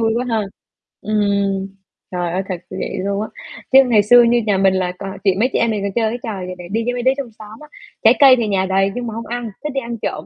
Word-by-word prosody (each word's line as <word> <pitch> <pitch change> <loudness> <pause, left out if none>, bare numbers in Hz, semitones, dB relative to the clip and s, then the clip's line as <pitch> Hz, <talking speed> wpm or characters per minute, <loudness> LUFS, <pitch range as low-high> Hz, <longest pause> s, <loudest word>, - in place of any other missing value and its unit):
vui 225 -1 +2
quá 245 - -1
ha. 225 -2 0 0.6
Ừm, 200 -2 0 0.4
trời 175 -2 -2
ơi 185 - -1
thật 185 - -1
như 190 - -7
vậy - - -4
luôn 200 +2 -2
á. 220 - -3 0.4
Chứ 265 - +8
ngày 220 -4 +3
xưa 240 +3 +7
như 235 0 +3
nhà 200 - +2
mình 190 0 +3
là 185 -1 -1
toàn 195 0 -6
chị 190 -2 +3
mấy 250 - +2
chị - - +1
em 230 - +2
mình 205 -2 -2
toàn 200 - -2
chơi 225 -2 +1
cái 245 - -5
trò 200 -6 -5
vậy 185 0 -6
nè, 175 -1 -9
đi 225 +1 0
với 245 - -1
mấy 245 -1 -3
đứa 260 - +4
trong 255 -5 -5
xóm 215 +1 -11
á, 300 - -13 0.4
trái - - +7
cây 270 -2 +8
thì 230 -3 -1
nhà 190 -2 +1
đầy 195 +1 +1
nhưng 245 -1 -4
mà 225 - -5
hông 230 +1 -6
ăn, 240 -2 -4
thích 300 - -3
đi 270 - -1
ăn 235 0 -6
trộm. - - -4
215 Hz, 295 wpm, -18 LUFS, 195-240 Hz, 0.6 s, Chứ